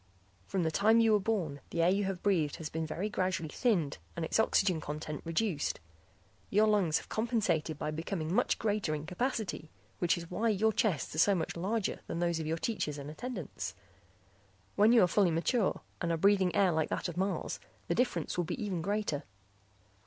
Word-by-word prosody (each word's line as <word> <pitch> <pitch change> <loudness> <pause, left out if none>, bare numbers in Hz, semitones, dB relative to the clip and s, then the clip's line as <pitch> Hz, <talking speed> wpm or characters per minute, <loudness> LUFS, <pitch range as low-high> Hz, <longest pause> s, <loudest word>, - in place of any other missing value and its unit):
"From 190 -3 0
the 160 - +1
time 220 +7 +4
you 225 -1 +5
were 210 - +5
born 185 -9 -1
the 170 - 0
air 170 - +5
you 200 +1 +1
have 190 -2 -3
breathed 170 -8 +2
has 155 -2 -6
been 160 0 -3
very 180 +6 -2
gradually 185 -5 -1
thinned 180 - +1 0.2
and 170 - -2
its 160 - 0
oxygen 190 -6 +3
content 150 0 -5
reduced. 165 -1 -1 0.7
Your 210 +2 +4
lungs 200 -7 +3
have - - -7
compensated 210 -9 0
by 150 - -3
becoming 160 +1 -3
much - - +2
greater 205 -7 0
in 150 0 -5
capacity, 190 - -2 0.3
which 175 -1 +2
is 170 0 -8
why 225 +6 +1
your 220 +1 +2
chests 190 - 0
are 155 - -3
so 200 +4 +5
much 170 - -2
larger 195 +5 -1
than - - -3
those 170 -1 0
of 160 - -3
your 160 +1 0
teachers 160 -7 -2
and 145 +1 -6
attendants; 210 - -5 1.0
when 210 +3 +5
you 235 -4 +7
are - - +5
fully 190 +1 +3
mature 185 +7 +1 0.2
and 170 -2 0
are 165 - +1
breathing 190 -1 +3
air 190 -3 +4
like 160 -1 0
that - - -2
of 175 - -6
Mars, 190 +2 -2 0.3
the - - +1
difference 180 -12 0
will 175 - +1
be 160 - -4
even 195 -6 -2
greater. 200 -5 -1
180 Hz, 195 wpm, -32 LUFS, 160-210 Hz, 1.0 s, you